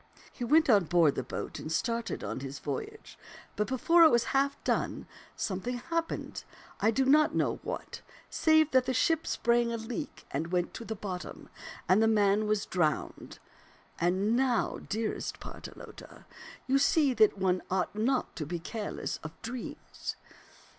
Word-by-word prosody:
He -, -, -7 dB
went 310 Hz, +7 st, +4 dB
on 205 Hz, -7 st, +5 dB
board 165 Hz, -3 st, +4 dB
the -, -, -2 dB
boat 125 Hz, -, -6 dB
and 155 Hz, -, -6 dB
started 230 Hz, +6 st, -1 dB
on -, -, -4 dB
his 135 Hz, +1 st, -6 dB
voyage; 140 Hz, -2 st, -6 dB, 0.4 s
but 210 Hz, -, 0 dB
before 335 Hz, +7 st, +4 dB
it 320 Hz, -, +9 dB
was 235 Hz, -3 st, +3 dB
half 275 Hz, +1 st, +2 dB
done, -, -, -1 dB, 0.3 s
something 215 Hz, +6 st, -3 dB
happened, 330 Hz, +6 st, -3 dB, 0.4 s
I 220 Hz, -, +3 dB
do 260 Hz, +4 st, +2 dB
not 300 Hz, +3 st, +4 dB
know -, -, +1 dB
what, -, -, -6 dB, 0.3 s
save 315 Hz, -1 st, +3 dB
that 260 Hz, -1 st, +4 dB
the 260 Hz, -, 0 dB
ship 325 Hz, +5 st, +2 dB
sprang 235 Hz, 0 st, +2 dB
a 230 Hz, -, -2 dB
leak 240 Hz, +6 st, -6 dB
and 160 Hz, +5 st, -3 dB
went 180 Hz, -1 st, 0 dB
to 230 Hz, -, -7 dB
the 220 Hz, -, -4 dB
bottom, 190 Hz, -3 st, -7 dB, 0.4 s
and 190 Hz, +4 st, +5 dB
the 225 Hz, -, +4 dB
man 210 Hz, -1 st, +3 dB
was 210 Hz, -1 st, +1 dB
drowned. 160 Hz, -5 st, -2 dB, 0.6 s
And 190 Hz, +6 st, +2 dB
now, 250 Hz, -2 st, +1 dB
dearest 220 Hz, +1 st, -3 dB
Partelote, -, -, -11 dB, 0.4 s
you 270 Hz, +1 st, +3 dB
see 280 Hz, -1 st, +3 dB
that 215 Hz, -4 st, +4 dB
one 185 Hz, -1 st, +1 dB
ought 185 Hz, -1 st, 0 dB
not 250 Hz, +5 st, 0 dB
to 150 Hz, -, -4 dB
be 175 Hz, -, -3 dB
careless 205 Hz, +5 st, -4 dB
of 160 Hz, 0 st, -9 dB
dreams. 240 Hz, +2 st, -6 dB
225 Hz, 160 wpm, -30 LUFS, 185-260 Hz, 0.6 s, it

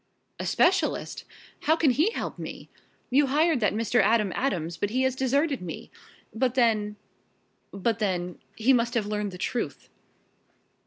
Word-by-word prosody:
"A -, -, -3 dB
specialist? 375 Hz, +2 st, +1 dB, 0.4 s
How 315 Hz, -, +5 dB
can 320 Hz, -5 st, +3 dB
he 310 Hz, -, +3 dB
help -, -, -5 dB
me? -, -, -8 dB, 0.4 s
You 280 Hz, +2 st, +4 dB
hired 305 Hz, +1 st, +2 dB
that 210 Hz, -2 st, +1 dB
Mr. 230 Hz, +2 st, +2 dB
Adam 215 Hz, -4 st, +3 dB
Adams 175 Hz, -, -1 dB
but 205 Hz, -, -2 dB
he 255 Hz, +4 st, 0 dB
has 260 Hz, -1 st, +1 dB
deserted 275 Hz, -, +1 dB
me. 175 Hz, -2 st, -7 dB, 0.4 s
But 250 Hz, +2 st, 0 dB
then 215 Hz, -4 st, +2 dB, 0.8 s
but 225 Hz, +3 st, -1 dB
then 180 Hz, -4 st, -2 dB, 0.2 s
he 245 Hz, +4 st, +3 dB
must 240 Hz, 0 st, +1 dB
have 225 Hz, -3 st, +1 dB
learned 210 Hz, 0 st, -2 dB
the 180 Hz, -, -8 dB
truth!" 235 Hz, +6 st, -3 dB
235 Hz, 155 wpm, -27 LUFS, 210-270 Hz, 0.8 s, How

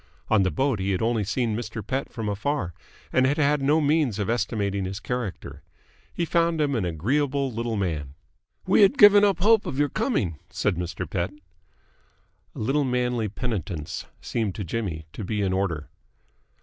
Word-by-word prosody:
On 110 Hz, -2 st, +4 dB
the 95 Hz, -, +2 dB
boat 135 Hz, 0 st, 0 dB
he 95 Hz, +1 st, 0 dB
had 90 Hz, -, -1 dB
only 115 Hz, -2 st, +1 dB
seen 110 Hz, +2 st, -1 dB
Mr. 115 Hz, -1 st, -5 dB
Pett 135 Hz, +1 st, -2 dB
from 110 Hz, -3 st, -4 dB
afar, 105 Hz, -, -1 dB, 0.4 s
and 130 Hz, 0 st, +4 dB
had 145 Hz, -, +1 dB
had 150 Hz, -1 st, +2 dB
no 145 Hz, +4 st, +3 dB
means 145 Hz, -7 st, +2 dB
of 105 Hz, +1 st, -1 dB
estimating 100 Hz, -4 st, -1 dB
his 95 Hz, +2 st, -4 dB
character. 115 Hz, -2 st, -5 dB, 0.5 s
He 170 Hz, -, -2 dB
found 170 Hz, -1 st, +1 dB
him 145 Hz, -2 st, +1 dB
an 110 Hz, -7 st, 0 dB
agreeable 135 Hz, -, 0 dB
little 115 Hz, 0 st, -2 dB
man. 75 Hz, -8 st, -2 dB, 0.5 s
"We -, -, +4 dB
had 205 Hz, +7 st, +5 dB
given 205 Hz, -1 st, +8 dB
up 200 Hz, -4 st, +3 dB
all 210 Hz, -, +4 dB
hope 225 Hz, -2 st, +5 dB
of 130 Hz, -, -4 dB
your 145 Hz, 0 st, +2 dB
coming," 115 Hz, -, -1 dB
said 100 Hz, -, 0 dB
Mr. 85 Hz, -1 st, -4 dB
Pett. 90 Hz, 0 st, -1 dB, 1.3 s
A -, -, -7 dB
little 135 Hz, +7 st, +1 dB
manly 125 Hz, -4 st, 0 dB
penitence 100 Hz, -, -4 dB
seemed 110 Hz, -5 st, -2 dB
to 105 Hz, -, -4 dB
Jimmy 85 Hz, -5 st, -3 dB
to -, -, -6 dB
be 105 Hz, +2 st, -1 dB
in 95 Hz, -1 st, 0 dB
order. 85 Hz, -6 st, -1 dB
115 Hz, 180 wpm, -25 LUFS, 95-140 Hz, 1.3 s, given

